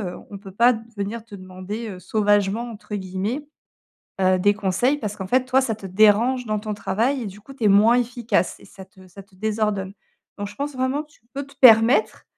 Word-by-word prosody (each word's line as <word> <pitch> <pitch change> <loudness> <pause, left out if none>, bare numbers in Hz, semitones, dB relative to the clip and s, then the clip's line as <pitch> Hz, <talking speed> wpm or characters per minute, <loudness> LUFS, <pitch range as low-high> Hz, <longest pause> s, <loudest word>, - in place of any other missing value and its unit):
heu, - - -10
on 200 - -7
peut 195 -1 -11
pas 240 +5 +5 0.2
venir 210 +3 -4
te 210 -3 -11
demander, 185 +4 -7
heu, 185 -3 -8
«sauvagement» 205 +3 +1
entre 210 -1 -8
guillemets, 200 +9 -4 0.8
heu, 185 0 +3
des 205 +3 +3
conseils 210 +8 0
parce 210 -4 -5
qu'en 190 - -6
fait, 255 +3 +2
toi 260 +1 +3
ça 230 -4 -1
te 205 - -15
dérange 215 +6 +3
dans 215 -1 -1
ton 215 0 -4
travail 225 +7 -1
et - - -5
du 200 +1 -9
coup, 275 - -13
tu 245 - -5
es - - +5
moins 215 +5 +5
efficace 235 -6 -1
et - - -16
ça 190 - -12
te 190 -1 -19
ça 195 +3 -12
te 190 -1 -27
désordonne. 210 -2 -2 0.5
Donc 205 0 -4
je - - -14
pense 285 0 -4
vraiment 260 +3 -1
que 300 - -29
tu - - -25
peux 280 0 -4
te 280 - -18
permettre 240 - +5
215 Hz, 225 wpm, -22 LUFS, 195-245 Hz, 0.8 s, pas